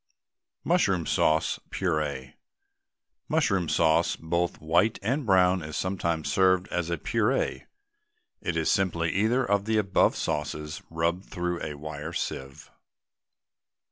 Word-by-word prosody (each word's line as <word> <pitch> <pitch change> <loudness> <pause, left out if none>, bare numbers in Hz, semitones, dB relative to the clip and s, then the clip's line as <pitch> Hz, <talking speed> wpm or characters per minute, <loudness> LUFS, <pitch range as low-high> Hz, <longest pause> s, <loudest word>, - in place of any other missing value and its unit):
MUSHROOM 95 - +2
SAUCE, 80 +2 +1
PUREE. 75 -7 -2 1.0
Mushroom 95 -6 +1
sauce, 80 +1 +3
both 85 +2 -2
white 85 +8 +2
and 130 +4 -1
brown, 95 -1 +4
is 75 -1 -5
sometimes 85 -4 -1
served 95 -2 +3
as 90 -1 -2
a 85 - -1
puree. - - 0 0.7
It - - -2
is - - +1
simply 85 -4 +1
either 115 +6 +2
of 100 -2 +1
the 110 0 +1
above 100 -3 +3
sauces 75 +1 -3
rubbed 85 +3 -1
through 90 -2 -3
a 75 -2 -4
wire 75 +2 -6
sieve. 65 -4 -5
85 Hz, 120 wpm, -27 LUFS, 80-95 Hz, 1.0 s, brown